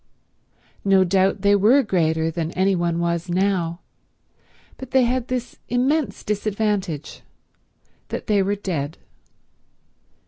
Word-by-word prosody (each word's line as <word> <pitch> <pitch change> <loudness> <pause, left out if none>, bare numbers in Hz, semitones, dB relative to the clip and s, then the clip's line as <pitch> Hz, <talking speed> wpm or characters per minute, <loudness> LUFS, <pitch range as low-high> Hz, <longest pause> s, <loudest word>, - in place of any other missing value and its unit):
No 195 -1 +4
doubt 190 +2 +1
they 200 0 +5
were 230 +8 +5
greater 160 -5 +1
than 165 -1 -3
any 190 +1 +2
one 170 -1 0
was 170 0 -1
now, 180 -2 0 1.0
but 265 - -9
they 260 0 +4
had 245 0 0
this 250 -1 -4
immense 265 +5 0
disadvantage, 205 -6 -2 0.9
that - - -5
they 210 -3 +2
were 200 +2 0
dead. 160 -7 -4
195 Hz, 115 wpm, -22 LUFS, 170-220 Hz, 1.0 s, they